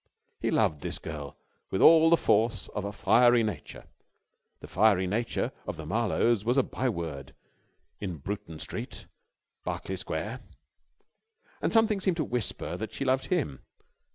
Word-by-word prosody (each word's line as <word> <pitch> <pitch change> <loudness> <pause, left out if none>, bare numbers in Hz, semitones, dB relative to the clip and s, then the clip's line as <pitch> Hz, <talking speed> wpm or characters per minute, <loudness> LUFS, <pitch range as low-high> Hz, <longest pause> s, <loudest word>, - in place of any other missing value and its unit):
He - - -1
loved 75 - +2
this - - -3
girl 75 -4 -7 0.3
with 95 - -1
all 165 0 +8
the 170 - +6
force 110 -3 +1
of 105 -1 -4
a 100 - -3
fiery 120 +3 +4
nature 105 -1 -5 0.8
the - - -10
fiery 100 -4 +3
nature 115 +5 -1 0.2
of - - -4
the - - -7
Marlowes 115 -3 +1
was 120 +4 +1
a 135 - +5
byword 85 - -4 0.6
in 90 -5 -4
Bruton 85 +1 -6
Street, 115 - -6 0.6
Berkeley - - -4
Square - - -4 1.2
and - - 0
something 225 -2 +3
seemed 185 -3 +1
to 155 - +1
whisper 120 - -3
that 110 +3 -5
she 135 - -3
loved 130 0 +1
him. 145 - -1
110 Hz, 150 wpm, -28 LUFS, 90-130 Hz, 1.2 s, all